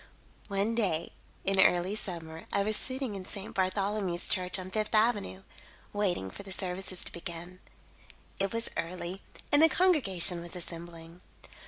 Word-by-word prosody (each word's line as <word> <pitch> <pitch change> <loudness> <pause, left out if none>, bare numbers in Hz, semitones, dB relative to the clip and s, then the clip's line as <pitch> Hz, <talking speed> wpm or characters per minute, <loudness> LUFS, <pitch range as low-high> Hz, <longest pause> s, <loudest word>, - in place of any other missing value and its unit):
"One 200 +2 0
day, 185 -8 0 0.3
in 195 0 +2
early 180 +1 +4
summer, 165 -6 -5
I 200 - +2
was 215 +1 +1
sitting 260 -2 -2
in 195 -2 -5
St. 195 +2 -7
Bartholomew's 190 -1 0
Church 180 -1 +1
on 185 0 -6
Fifth 215 +2 -1
Avenue, 215 -4 +2 0.5
waiting 185 - 0
for - - -9
the 195 -1 -9
services 185 -1 -2
to - - -1
begin. 175 +1 -6 0.8
It 195 0 +1
was 230 0 -2
early 180 +2 -4 0.3
and 290 - +6
the 325 - +8
congregation 200 - +4
was 170 +1 -7
assembling. 170 0 -8
190 Hz, 150 wpm, -30 LUFS, 175-210 Hz, 0.8 s, the